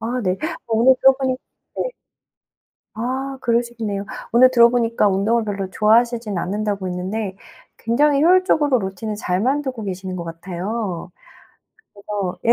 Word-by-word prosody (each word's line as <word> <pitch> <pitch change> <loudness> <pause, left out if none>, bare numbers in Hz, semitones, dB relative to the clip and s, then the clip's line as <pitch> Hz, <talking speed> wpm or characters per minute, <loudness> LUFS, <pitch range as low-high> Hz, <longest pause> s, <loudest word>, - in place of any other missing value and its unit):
아 240 +3 -2
네. 185 -1 0 0.3
오늘 235 +3 +4
들어 270 - +7
보니 260 -1 -1 0.4
네. - - 0 1.1
아 265 +4 -3
그러시겠네요. 235 -4 -1 0.3
오늘 255 +2 +6
들어 235 -2 +6
보니까 230 -3 +2
운동을 215 +4 +1
별로 195 -2 -4
좋아하시진 225 0 +2
않는다고 200 +1 -2
했는데 190 +2 -4 0.4
굉장히 280 +5 +2
효율적으로 325 -6 +4
루틴을 200 +1 -4
잘 180 -3 -1
만들고 260 0 -1
계시는 190 -1 -5
것 175 -2 -5
같아요. 180 +3 -5 0.8
그래서 200 -2 -4
예. 235 - +6
220 Hz, 315 characters per minute, -21 LUFS, 195-245 Hz, 1.1 s, 들어